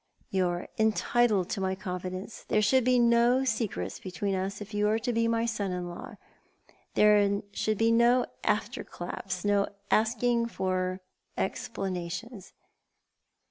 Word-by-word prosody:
"You 185 -2 +2
are 175 0 -3
entitled 220 -2 +2
to 195 - -2
my 190 0 0
confidence. 185 +2 -6
There 215 - +2
should 260 +4 +4
be 250 +1 +3
no 235 +2 +4
secrets 230 -5 -2
between 190 +2 -3
us 190 +1 -2
if 205 +1 -9
you 210 0 +2
are 220 - +2
to 240 +2 -2
be 230 0 +2
my 230 0 +1
son 215 -4 -2
in 180 -1 -3
law. 175 - -8 0.8
There 210 -1 +5
must 200 +1 -2
be 225 +2 +3
no 240 +2 +4 0.2
after 220 +4 0
claps; 180 +1 -6
no 205 -1 +3 0.2
asking 235 +1 +2
for 185 -3 -2 0.4
explanations. 185 +3 -4
210 Hz, 140 wpm, -29 LUFS, 185-230 Hz, 0.8 s, There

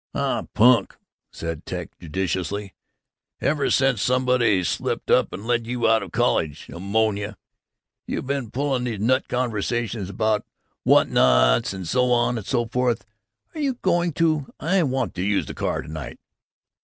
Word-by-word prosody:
"Aw - - -1
punk," 120 +2 +4 0.3
said 80 -2 -5
Ted - - -5
judicially. 95 +3 -3 0.7
"Ever 140 -1 +1
since 135 -5 +2
somebody 125 -6 +2
slipped 80 - -2
up - - +4
and 100 - -7
let 120 -1 0
you 120 -1 0
out 110 0 +4
of 95 -4 -8
college, 75 -3 0
Ammonia, 105 +2 -1 0.7
you - - -3
been 135 -3 -3
pulling 135 0 -1
these 115 -5 -3
nut 130 +5 +2
conversations 115 -3 -2
about 105 +2 0 0.4
what - - +5
nots - - +4
and 95 -3 -6
so 125 +5 +2
on 120 0 +2
and 105 - -10
so 120 -3 +1
forths. 125 0 0 0.5
Are 315 - -5
you 275 -3 0
going 175 -6 +1
to 155 -3 +1
I 185 +5 +2
want 135 -4 -1
to 90 - -4
use 100 +1 +1
the - - -7
car - - -2
to - - -13
night." 80 -3 -7
115 Hz, 155 wpm, -23 LUFS, 100-130 Hz, 0.7 s, what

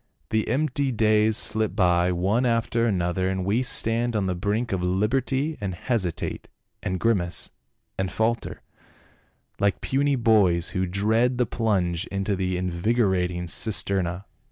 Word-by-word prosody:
The 110 0 0
empty 140 -1 0
days 110 -1 +3
slip 110 0 +2
by 90 -2 +3
one 95 +7 +1
after 115 -1 +1
another, 95 -2 0
and 95 -1 -2
we 105 +6 +1
stand 120 -1 0
on 105 -2 0
the 95 - 0
brink 105 +7 -2
of 95 -2 -1
liberty, 130 - 0
and 95 -3 -3
hesitate, 95 -5 -2 0.3
and 95 0 -2
grimace, 95 -6 0 0.5
and 95 -2 -1
falter, 115 +3 -2 1.0
like 100 -1 +1
puny 140 +1 +1
boys 100 -8 +3
who 95 0 -1
dread 110 +7 +1
the 125 - +2
plunge 95 -7 -1
into 100 +1 -2
the 95 -1 -1
in 90 0 -2
vigorating 90 -2 0
cisterna." 95 -2 -1
100 Hz, 140 wpm, -25 LUFS, 90-115 Hz, 1.0 s, days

